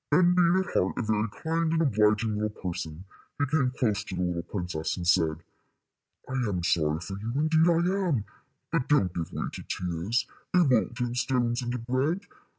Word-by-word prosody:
Then, 180 -1 +5
being 175 -1 +4
at 190 - -1
heart 90 - +1
a - - 0
very 110 0 0
kind 165 0 +1
and 165 - +2
obliging 110 -3 +2
little 105 0 0
person, 85 -2 -5 0.3
he 145 - +1
came 140 -2 +1
close 120 -5 0
to - - -6
the 90 -1 -1
princess, 85 -2 -3
and 85 -1 -4
said: 80 -2 +2 0.8
"I - - -9 0.2
am 90 -3 -2
sorry 80 -2 +1
for 95 +2 -6
you 110 +3 -4
indeed 160 +3 +3
I 180 +3 +2
am, 125 - 0 0.5
but 160 -6 0
don't 100 - +3
give 85 -2 -4
way - - -3
to - - -7
tears. 90 +7 -2 0.3
They 180 - +6
won't 125 -5 +2
turn 120 -2 -1
stones 125 -1 0
into 120 0 -2
bread. 130 +9 0
120 Hz, 185 wpm, -28 LUFS, -, 0.8 s, They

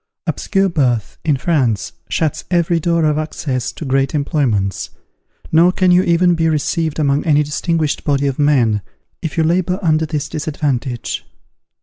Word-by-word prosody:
_ - - -57 0.2
Obscure 195 -1 0
birth, 130 - 0
in 150 -4 +2
France, 130 - 0 0.2
shuts 155 -3 -1
every 170 -1 +2
door 170 0 +1
of 150 0 +1
access 140 -5 -3
to 160 - -8
great 135 +2 +1
employments; 130 - 0 0.6
nor 170 +3 +5
can 185 0 +2
you 180 +1 +5
even 175 0 +3
be 165 -1 +1
received 160 +1 -1
among 145 -2 +1
any 150 -2 +3
distinguished 155 +1 -1
body 140 -1 +1
of 135 0 -1
men, 125 -8 +3 0.4
if 160 -1 -5
you 165 - +3
labour 180 +2 +1
under 160 -1 +2
this 150 -2 -3
disadvantage. 145 -6 -3
155 Hz, 155 wpm, -17 LUFS, 140-165 Hz, 0.6 s, nor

